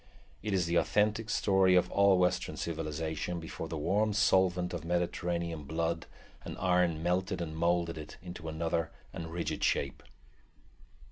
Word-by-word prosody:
It 105 -1 -1
is 90 -2 +2
the 85 +1 +1
authentic 105 +3 +2
story 95 -4 +4
of 90 - +3
all 100 -1 +5
western 90 -4 +1
civilization 80 +1 -3
before 80 0 -6
the 80 - -4
warm 100 +8 +1
solvent 95 -3 +3
of 85 -3 -4
Mediterranean 85 -2 -1
blood 80 +2 -2 0.4
and - - -7
iron 90 -3 +2
melted 90 +2 0
and 80 -2 -4
moulded 85 0 +1
it 75 - -9
into 85 -2 -7
another 80 0 -1 0.2
and 80 0 -6
rigid 80 -2 -3
shape. 70 -1 0
85 Hz, 145 wpm, -31 LUFS, 80-95 Hz, 0.4 s, all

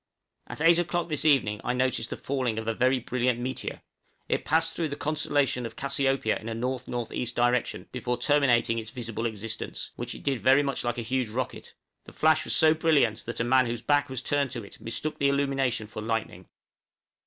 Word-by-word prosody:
At - - -6
eight 165 +1 +6
o'clock 175 0 -1
this 155 0 +1
evening 115 -9 +3
I 125 - 0
noticed 130 +1 0
the - - -5
falling 130 -5 -2
of 110 0 -4
a 115 - +1
very 130 +3 +2
brilliant 125 0 0
meteor; 130 +2 -4 0.4
it - - 0
passed 160 +1 +2
through 165 - -1
the 140 - -4
constellation 145 -4 0
of 115 -1 -6
Cassiopeia 135 -4 0
in 110 - -7
a - - -3
N.N.E. 125 -1 -3
direction 120 0 +1
before 125 -1 -2
terminating 120 -3 +3
its 110 0 -7
visible 115 -2 -3
existence, 110 0 -5
which - - -5
it - - -11
did 135 -4 -1
very 135 +2 +5
much 140 -2 -2
like 120 0 -1
a 120 - -2
huge 125 0 -1
rocket; 125 +3 -5 0.3
the - - -13
flash 155 0 +3
was - - +1
so 155 -1 +6
brilliant 150 -10 +2
that 115 0 -3
a - - +2
man 130 +1 +4
whose 115 0 -4
back 145 +1 +2
was 130 -1 -4
turned 145 -1 +1
to 120 -2 -5
it 100 - -13
mistook 135 +7 -4
the 140 - +3
illumination 135 -4 0
for 110 0 -7
lightning. 110 -5 -3
125 Hz, 200 wpm, -27 LUFS, 115-140 Hz, 0.4 s, eight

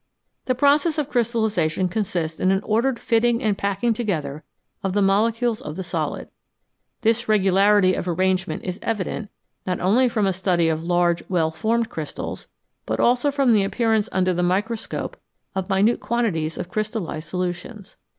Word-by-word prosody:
The 255 - +1
process 290 +4 +3
of 300 -3 -2
crystallisation 220 -8 +1
consists 175 -5 -2
in 185 - +2
an 195 +1 +1
ordered 235 +4 +1
fitting 230 +1 +1
and 215 -2 +2
packing 200 +4 0
together 160 - -3 0.4
of 190 -1 -2
the 205 - +2
molecules 225 +4 +1
of 150 - -6
the 190 - -4
solid. - - -3 0.7
This 230 0 +1
regularity 195 -1 +4
of 185 - -3
arrangement 185 +2 0
is 185 +2 -4
evident 210 0 -3 0.4
not 180 -1 -1
only 240 +8 +3
from 215 -3 0
a 190 - +1
study 175 -3 +1
of 160 0 -1
large, 175 0 +2
well 165 -4 +1
formed 225 +8 0
crystals, 155 -2 -6 0.4
but - - -1
also 245 +4 +3
from 275 -4 +3
the 205 -2 +4
appearance 220 +1 +1
under 185 -1 +1
the 175 - -1
microscope 205 +6 -2 0.4
of 190 -1 -3
minute 200 +5 +3
quantities 175 -10 -1
of - - -4
crystallised 205 -7 -3
solutions. 185 +4 -5
200 Hz, 160 wpm, -23 LUFS, 180-230 Hz, 0.7 s, regularity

